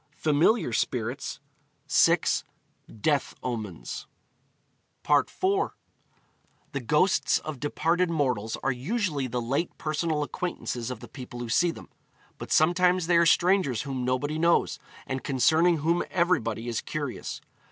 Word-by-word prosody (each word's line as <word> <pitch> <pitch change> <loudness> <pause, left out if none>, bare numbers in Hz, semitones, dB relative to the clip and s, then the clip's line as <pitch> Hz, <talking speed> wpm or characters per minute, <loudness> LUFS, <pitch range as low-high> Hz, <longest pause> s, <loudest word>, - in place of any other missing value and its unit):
Familiar 155 - +2
Spirits; 120 +2 -2 0.5
6. - - +3 0.6
Death 145 +1 +1
Omens. 110 -8 -5 1.0
IV. 145 -1 +4 1.4
The 140 - -2
ghosts 150 - +3
of 155 -4 -6
departed 165 +5 +1
mortals 125 -9 -1
are 135 - +2
usually 145 - -1
the 125 0 -2
late 135 +8 -2
personal 155 0 -1
acquaintances 135 -7 -4
of 125 -3 -6
the - - -9
people 125 -3 -9
who 120 -1 -5
see 175 +9 +3
them. 165 - -8 0.5
But - - -7
sometimes 180 +2 +3
they 170 0 +4
are 170 0 +5
strangers 175 - +3
whom 135 -3 -3
nobody 130 +5 -1
knows, 170 +1 +2 0.3
and 130 0 -4
concerning 160 +6 +3
whom 165 +3 +1
everybody 120 - 0
is 115 -2 -2
curious. 145 -4 -5
145 Hz, 125 wpm, -27 LUFS, 125-170 Hz, 1.4 s, are